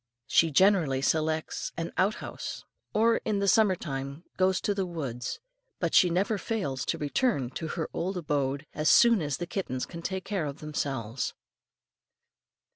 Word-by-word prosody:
She 165 - +4
generally 160 -5 +3
selects 155 +1 0
an 165 0 -3
out 200 +4 +2
house, - - -7 0.3
or 230 +2 +3
in 215 -2 -1
the 200 0 0
summer 205 -2 +5
time 140 -1 -5
goes 185 0 +2
to 205 - +1
the 195 -2 -1
woods, 130 -8 -4 0.4
but - - -1
she 180 - +6
never 195 +4 +1
fails 145 - -2
to - - 0
return 145 - 0
to 160 +5 -4
her 160 0 -3
old 185 +2 -2
abode, 145 -3 -1
as 155 +1 +1
soon 235 -5 +6
as 145 -3 -1
the 175 - -3
kittens 150 -9 -3
can 170 -1 -8
take 190 +2 -3
care 190 -7 -1
of 140 0 -6
themselves. 135 -6 -3
165 Hz, 165 wpm, -28 LUFS, 140-195 Hz, 0.4 s, she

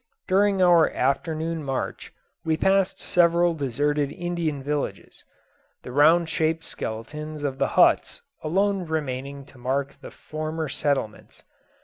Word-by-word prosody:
During 195 0 +3
our 170 -3 +6
afternoon 160 +4 -1
march 135 -2 -4 0.3
we 160 -1 0
passed 195 +1 +2
several 170 0 +3
deserted 145 0 -1
Indian 170 -5 -3
villages 145 0 -4 0.6
the 125 - -8
round 160 +5 +5
shaped 160 0 0
skeletons 150 +7 -6
of 135 -2 -3
the - - +2
huts - - +3 0.2
alone 195 +4 +1
remaining 140 -3 -4
to 130 - -18
mark 135 +3 -1
the - - -9
former 155 0 -5
settlements. 135 -9 -3
155 Hz, 120 wpm, -25 LUFS, 140-170 Hz, 0.6 s, our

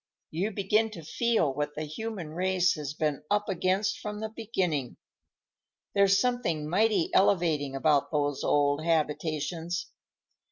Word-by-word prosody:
You 180 +7 -1
begin 210 +2 +1
to 165 - -9
feel 165 - +1
what 145 +1 -3
the 155 - -3
human 180 +2 -5
race 180 +2 +1
has 150 -2 -5
been 150 -3 -1
up 205 0 +1
against 190 +3 0
from 210 0 -5
the 220 0 -4
beginning. 190 - -2 1.0
There's 195 0 +4
something 220 -11 0
mighty 200 +1 +2
elevating 160 -8 +2
about 145 0 +2
those 145 -2 0
old 145 +1 +2
habitations. 165 +2 -1
170 Hz, 130 wpm, -28 LUFS, 150-200 Hz, 1.0 s, There's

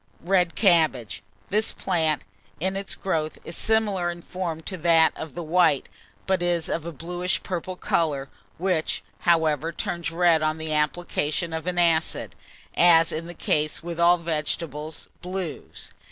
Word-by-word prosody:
RED 180 -1 +2
CABBAGE. 160 - +2 0.3
This 215 +2 +1
plant, 160 -6 0 0.4
in 190 +4 -1
its 195 0 -3
growth, 155 -5 -2
is 165 - -4
similar 210 -5 +1
in 170 0 -6
form 170 -3 -4
to 185 - -5
that 165 -1 +4
of 160 - -7
the 175 - -4
white, 160 -4 +3 0.4
but 190 -2 +1
is 175 -2 +1
of 165 0 -2
a - - -4
bluish 175 +4 -2
purple 185 0 -4
colour, 150 -6 0 0.3
which, 180 -3 0 0.2
however, 160 -2 +2
turns 170 +1 -3
red 165 -1 +3
on 155 0 0
the 160 -1 -3
application 155 +1 -1
of 160 +2 -4
acid, 170 -2 +1 0.4
as 165 -1 +6
is 160 +1 -4
the 175 +1 -8
case 155 +1 0
with 170 0 -5
all 175 +1 +6
vegetable 155 -2 -3 0.3
blues. 180 -3 -6
170 Hz, 150 wpm, -25 LUFS, 160-180 Hz, 0.4 s, as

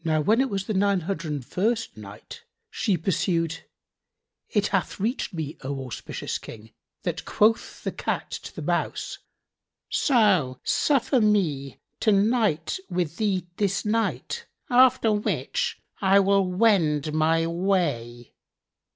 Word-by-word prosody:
When 160 - +2
it 270 - 0
was 195 -2 -2
the 215 - -2
Nine 200 -1 +2
Hundred 170 -2 -4
and 140 -4 -4
First 225 - -1
Night, 105 -1 -11 0.3
She 195 -4 0
pursued: 165 -1 -1 0.8
It 205 -1 +1
hath 195 -1 -1
reached 225 +5 -1
me, 160 -4 -5
O 135 -1 -4
auspicious 125 - -5
King, 110 0 -11 0.3
that - - -3
quoth 220 +2 +1
the - - -2
Cat - - -3
to - - -7
the - - -6
Mouse, - - -2 0.7
"So 190 - +3
suffer 270 -3 +2
me 165 -11 +1 0.2
to 220 - +3
night 205 - +2
with 175 -3 -2
thee 195 -5 0
this 200 -1 0
night, 225 +2 -1 0.2
after 245 -3 +5
which 485 - -1 0.2
I 195 0 +5
will 195 -1 +3
wend 170 -7 +2
my 160 +1 +2
way." 165 - -1
190 Hz, 130 wpm, -25 LUFS, 155-210 Hz, 0.8 s, after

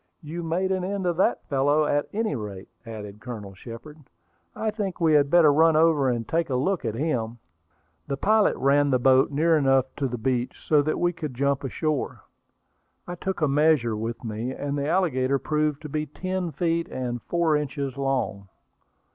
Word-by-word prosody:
"You 160 +3 -5
made 175 +3 -1
an 185 -1 0
end 195 0 -3
of 175 -2 0
that 190 - +1
fellow, 145 +2 +2
at 145 0 0
any 215 -7 -1
rate," 100 -5 -7 0.2
added 105 -2 -8
Colonel 110 -6 -7
Shepard. 120 +10 -11 0.6
"I 220 - -1
think 205 -4 -4
we 165 -2 +3
had 145 -2 +4
better 160 -2 +6
run 160 +1 +4
over 155 -4 +4
and 120 -2 -2
take 165 -1 0
a 130 - 0
look 175 +9 0
at 115 -2 -2
him." 120 -5 -2 0.7
The 140 - -2
pilot 215 +5 +3
ran 145 +1 +3
the 130 - +3
boat 130 +1 +4
near 160 +3 +2
enough 135 -3 +3
to 140 - 0
the 125 -1 -4
beach 125 +1 -2
so 150 -2 +5
that 155 +2 -1
we 175 0 +1
could 155 -6 -6
jump 140 +2 0
ashore. 150 +2 -2 0.8
I 175 - -6
took 190 +1 -4
a 150 - +3
measure 140 -5 +3
with 115 +3 -5
me, 110 +2 -4
and 140 +1 -4
the 140 0 -2
alligator 140 -7 +1
proved 150 +1 -1
to 150 - -6
be 150 +1 -2
ten 180 +4 -3
feet 165 +3 -1
and 120 -2 -4
four 170 -3 +1
inches 140 -2 -3
long. 135 -8 -2
145 Hz, 190 wpm, -25 LUFS, 130-165 Hz, 0.8 s, better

